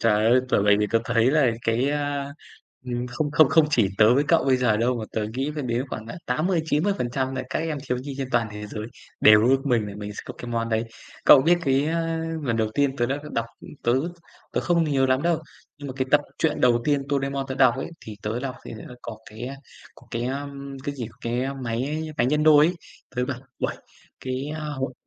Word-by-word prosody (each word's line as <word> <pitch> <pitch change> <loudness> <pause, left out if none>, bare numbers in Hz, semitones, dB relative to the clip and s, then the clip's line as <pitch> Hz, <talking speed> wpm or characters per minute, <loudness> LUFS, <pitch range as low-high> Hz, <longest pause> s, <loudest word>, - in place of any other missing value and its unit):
Trời 105 -1 +3
ơi! 130 +1 +6
Bởi 100 - +3
vậy 105 0 +5
thì 105 - +2
tớ 115 - +5
thấy 115 +3 +3
là 150 -5 +4
cái, 120 +5 +1
a, 145 -1 -2 0.5
ừm, 120 0 -3
không 125 +4 -2
không 155 -2 +5
không 160 +3 +5
chỉ 115 -9 +3
tớ 110 +3 +6
với 145 +2 +3
cậu 165 - +4
bây 130 -1 +4
giờ 120 -4 +2
đâu, 120 +2 +1
mà 110 - -4
tớ 110 -1 -1
nghĩ 135 +3 -1
phải 150 - -3
đến 120 +1 -1
khoảng, 110 -2 -6
à, 115 - -7
80-90% 150 -3 0
nà 130 - -2
các - - 0
em 160 -3 -2
thiếu 125 - 0
nhi 135 +2 -6
trên 135 -2 -3
toàn 120 -3 +1
thế 105 0 -6
giới 105 +1 -6 0.4
đều 105 +1 +7
ước 135 +2 +2
mình 120 -5 +2
là 100 - -8
mình 105 0 -6
sẽ - - -6
có - - -8
cái 120 - -7
món 115 0 -1
đấy. 110 0 0 0.4
Cậu 135 - +9
biết 175 +3 +4
cái, 135 0 +2
a, 165 0 -1 0.2
lần 120 -5 0
đầu 110 -1 0
tiên 140 -1 +1
tớ 120 - +1
đã 135 +3 -1
đ - - -7
đọc 115 0 -1
ưm, - - -11
tớ 120 - +2 0.6
tớ - - +1
không 170 -2 +2
thấy 150 -3 -1
nhớ 135 0 +3
lắm 130 +1 +2
đâu, 170 -1 +2 0.4
nhưng 145 -1 -7
mà 130 - -6
cái 130 -1 -1
tập 150 - +6 0.2
truyện 155 -2 +1
đầu 120 -1 +4
tiên 145 -2 +2
Doremon 140 -1 -1
tớ 130 - -3
đọc 130 -3 +5
ấy, 135 - -4
thì 110 -1 -9
tớ 110 +3 -2
đọc 130 -1 -4
thì - - -8
nó 115 +3 -10
có 110 -2 -7
cái, 110 +3 -7
a, 135 +2 -6 0.4
có - - -19
cái, 115 +1 -2
ưm, 140 +1 -5
cái 145 -2 -3
gì, 120 -5 -5
cái, 120 +1 -1
ơ, 135 +1 -3
máy 135 +5 -3
máy 120 - +3
nhân 150 +3 +2
đôi 150 -1 +7
ấy. 175 - 0 0.4
Tớ 125 - +1
bảo, 130 -2 -3 0.2
uầy, - - -2 0.4
cái, 130 +2 -3
a, - - -5
hội 135 -3 -3
130 Hz, 250 wpm, -24 LUFS, 120-145 Hz, 0.6 s, Cậu